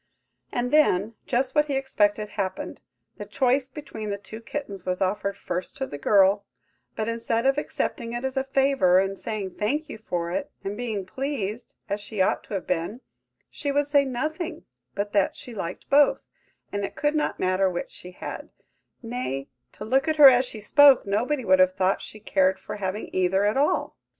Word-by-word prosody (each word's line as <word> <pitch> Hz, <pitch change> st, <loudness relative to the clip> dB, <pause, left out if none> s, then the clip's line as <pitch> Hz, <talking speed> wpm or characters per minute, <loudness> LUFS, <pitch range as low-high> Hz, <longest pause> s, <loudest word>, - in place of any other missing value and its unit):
And 245 Hz, +1 st, -1 dB
then, 230 Hz, -9 st, +3 dB
just 260 Hz, +1 st, 0 dB
what 300 Hz, 0 st, +3 dB
he 280 Hz, -, -1 dB
expected 210 Hz, -6 st, +1 dB
happened,–the 200 Hz, +1 st, -6 dB
choice 255 Hz, +4 st, +1 dB
between 225 Hz, -7 st, -7 dB
the 200 Hz, -, -2 dB
two 220 Hz, +2 st, -10 dB
kittens 225 Hz, -7 st, -6 dB
was 180 Hz, 0 st, -2 dB
offered 200 Hz, +1 st, -1 dB
first 180 Hz, +1 st, -5 dB
to 270 Hz, -, -2 dB
the 145 Hz, -, -8 dB
girl; 200 Hz, +3 st, +4 dB, 0.5 s
but, 220 Hz, -, -2 dB
instead 230 Hz, +1 st, -1 dB
of 270 Hz, +2 st, +3 dB
accepting 235 Hz, -5 st, -3 dB
it 240 Hz, +2 st, -3 dB
as 265 Hz, 0 st, -2 dB
a 265 Hz, -, +1 dB
favour, 270 Hz, -9 st, +3 dB
and 195 Hz, +1 st, +1 dB
saying 200 Hz, -3 st, -5 dB
"Thank 295 Hz, +9 st, -1 dB
you" -, -, -8 dB
for 170 Hz, -5 st, -3 dB
it, 285 Hz, +10 st, -2 dB
and 200 Hz, +1 st, -3 dB
being 220 Hz, -4 st, -3 dB
pleased, 240 Hz, -1 st, -4 dB
as 205 Hz, +1 st, -2 dB
she 205 Hz, 0 st, -7 dB
ought 185 Hz, -, +2 dB
to 210 Hz, -, -5 dB
have 190 Hz, -, -3 dB
been, 180 Hz, +8 st, -2 dB, 0.5 s
she 285 Hz, -, -3 dB
would 290 Hz, +1 st, +2 dB
say 285 Hz, 0 st, +4 dB
nothing 310 Hz, +6 st, -4 dB, 0.3 s
but 205 Hz, +1 st, -3 dB
that 200 Hz, -2 st, +2 dB
she 245 Hz, -, -10 dB
liked 185 Hz, -4 st, -6 dB
both, 285 Hz, +1 st, +4 dB, 0.5 s
and 205 Hz, 0 st, -2 dB
it 200 Hz, +1 st, -4 dB
could 295 Hz, 0 st, +1 dB
not 305 Hz, -1 st, -1 dB
matter 185 Hz, +1 st, +2 dB
which 175 Hz, -1 st, -4 dB
she 180 Hz, -, -11 dB
had; 180 Hz, -, -7 dB, 0.5 s
nay, 230 Hz, -, -4 dB, 0.2 s
to 210 Hz, -, -8 dB
look 265 Hz, +5 st, +2 dB
at 315 Hz, -, +2 dB
her 295 Hz, -3 st, +10 dB
as 250 Hz, +1 st, +3 dB
she 225 Hz, -, -7 dB
spoke, 280 Hz, +5 st, +6 dB
nobody 240 Hz, +7 st, 0 dB
would 185 Hz, -1 st, +5 dB
have 185 Hz, 0 st, +5 dB
thought 190 Hz, 0 st, +1 dB
she 215 Hz, -, -10 dB
cared 190 Hz, -2 st, +2 dB
for -, -, -7 dB
having 195 Hz, +1 st, -3 dB
either 185 Hz, +2 st, +2 dB
at 210 Hz, -, +2 dB
all! 280 Hz, +2 st, +1 dB
215 Hz, 190 wpm, -25 LUFS, 195-270 Hz, 0.5 s, her